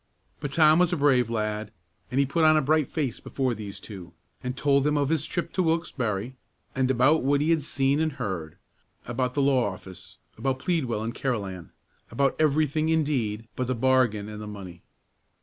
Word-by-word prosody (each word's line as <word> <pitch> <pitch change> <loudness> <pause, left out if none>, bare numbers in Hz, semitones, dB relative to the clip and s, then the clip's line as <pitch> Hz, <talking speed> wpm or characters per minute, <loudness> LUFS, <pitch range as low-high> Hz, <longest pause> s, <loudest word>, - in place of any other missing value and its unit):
But 145 -1 -5
Tom 155 +1 +5
was 180 -1 +3
a 175 - 0
brave 130 -5 +3
lad, 105 -1 -2 0.4
and 130 - 0
he 140 - +4
put 160 +5 0
on 155 0 +6
a - - +3
bright 155 0 +2
face 140 -7 -2
before 130 -3 -2
these 105 -3 -7
two, 95 -5 -10 0.3
and 125 +1 -4
told 140 -1 +3
them 150 +1 +1
of 140 -1 +1
his 160 -1 0
trip 175 - -3
to 185 - +1
Wilkesbarre, 130 - -1 0.4
and 130 -1 +1
about 130 +5 +4
what 140 +2 +2
he 155 +3 +2
had 165 -2 +3
seen 140 0 +1
and 160 -2 0
heard, 85 -10 -5 0.5
about 125 +1 -2
the 140 - +2
law 130 -6 +2
office, 95 -1 -10 0.2
about 130 +2 0
Pleadwell 130 -8 -1
and 115 +1 -3
Carolan, 100 -11 -3 0.4
about 135 +4 +1
every 155 0 +3
thing, 155 +2 -1
indeed, 130 -9 0
but 125 - -2
the 130 - 0
bargain 120 -4 +2
and 105 0 -7
the 105 - -7
money. 95 -4 -9
130 Hz, 195 wpm, -26 LUFS, 110-150 Hz, 0.5 s, on